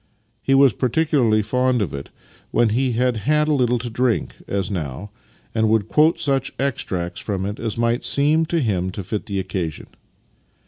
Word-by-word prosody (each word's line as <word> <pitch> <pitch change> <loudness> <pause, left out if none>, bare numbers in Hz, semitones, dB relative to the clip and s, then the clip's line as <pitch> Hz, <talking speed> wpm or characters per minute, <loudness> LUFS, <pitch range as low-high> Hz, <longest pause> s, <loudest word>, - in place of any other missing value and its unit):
He 135 - +2
was 135 -3 +6
par 125 - 0
ticularly 120 -8 +2
fond 125 +2 +1
of 95 -10 -2
it 70 0 -6 0.4
when 120 - +2
he 125 +3 +1
had 125 0 +1
had 150 +7 +1
a 155 - +2
little 125 -3 +2
to 120 +1 -4
drink 125 0 0
— - - -37
as 95 +1 -2
now 90 +2 -5 0.2
— - - -34
and 110 -1 +2
would 110 -2 +2
quote 155 +2 +3
such 135 -1 0
extracts 90 -10 -2
from 95 -3 -3
it 105 +1 -4
as 115 -2 -3
might 115 +1 +1
seem 155 +3 +3
to 170 -1 0
him 95 -7 0
to 100 - -5
fit 105 +3 -4
the 100 -2 -2
occasion. 90 -4 -4
115 Hz, 195 wpm, -21 LUFS, 100-135 Hz, 0.4 s, was